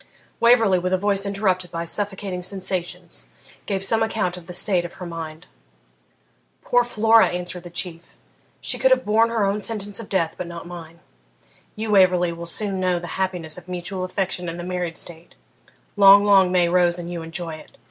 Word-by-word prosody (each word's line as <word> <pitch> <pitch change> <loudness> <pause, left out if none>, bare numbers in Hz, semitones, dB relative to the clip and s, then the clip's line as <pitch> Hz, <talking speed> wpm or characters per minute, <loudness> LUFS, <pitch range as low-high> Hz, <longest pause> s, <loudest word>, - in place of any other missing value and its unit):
Waverley, 225 -6 +5
with 180 +1 -2
a - - +4
voice 200 +1 0
interrupted 190 -3 -1
by 165 0 -4
suffocating 195 0 -3
sensations, 185 -1 -4 0.4
gave 195 -2 -1
some 225 +3 +1
account 220 -5 -1
of 175 -2 -12
the - - -7
state 180 0 +2
of 175 - -8
her 180 - -8
mind. 160 -2 -7 1.2
'Poor 245 0 +3
Flora!' 225 -1 +4
answered 180 0 -4
the 175 - -10
Chief, 170 -1 -6 0.4
'she - - -1
could - - +4
have - - +3
borne 225 +2 +3
her 225 -3 0
own 200 +2 -1
sentence 205 -2 -2
of 225 - -8
death, 165 -4 0
but 180 - -4
not 170 -1 -8
mine. 170 -1 -10 0.7
You, 220 0 -3
Waverley, 180 -3 +4
will 170 0 -7
soon 195 +2 -1
know 185 -1 +1
the 175 +2 -5
happiness 175 -4 -1
of - - -19
mutual 180 +1 -4
affection 185 -1 -3
in 165 - -6
the 175 - -6
married 180 -2 -3
state 170 0 -5 0.6
long, 200 0 +8
long 195 -3 +5
may 180 -1 +3
Rose 175 0 +3
and 175 0 -6
you 170 - -5
enjoy 165 0 -5
it! 155 - -16
185 Hz, 190 wpm, -22 LUFS, 175-200 Hz, 1.2 s, long